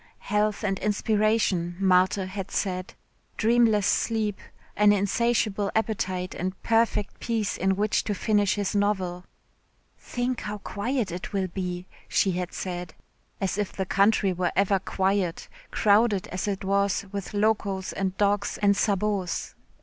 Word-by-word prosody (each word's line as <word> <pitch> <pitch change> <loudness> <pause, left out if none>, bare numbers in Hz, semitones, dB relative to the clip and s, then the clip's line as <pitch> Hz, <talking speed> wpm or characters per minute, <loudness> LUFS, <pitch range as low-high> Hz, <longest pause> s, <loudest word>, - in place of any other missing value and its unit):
Health 210 +1 0
and 195 -2 0
inspiration, 210 -4 +1
Marthe 185 0 +3
had 195 0 -5
said, 185 -1 -2 0.4
dreamless 225 -3 +3
sleep, 215 -3 0 0.4
an 210 0 +5
insatiable 205 0 +1
appetite 185 -5 -1
and 185 +1 -4
perfect 225 -2 +1
peace 220 -4 -1
in 190 +1 +1
which 205 +2 +1
to 205 - -1
finish 205 0 +2
his 205 -2 -1
novel. 190 -3 0 0.7
"Think 245 0 -3
how 210 0 -4
quiet 215 +1 -2
it 180 +4 -6
will 190 -2 0
be," 180 0 -4 0.2
she 195 - +2
had 180 0 -3
said. 175 -3 -5 0.4
As 195 0 -1
if 205 - -1
the 190 - -2
country 200 0 +3
were 180 0 0
ever 195 0 +3
quiet, 190 -2 -1 0.2
crowded 210 -1 +3
as 185 +3 -3
it 195 -1 -2
was 200 0 +1
with 200 +1 -5
locos 205 -2 0
and 190 -1 -2
dogs 205 0 +1
and 200 -1 +4
sabots. 200 -3 -1
200 Hz, 140 wpm, -26 LUFS, 185-210 Hz, 0.7 s, an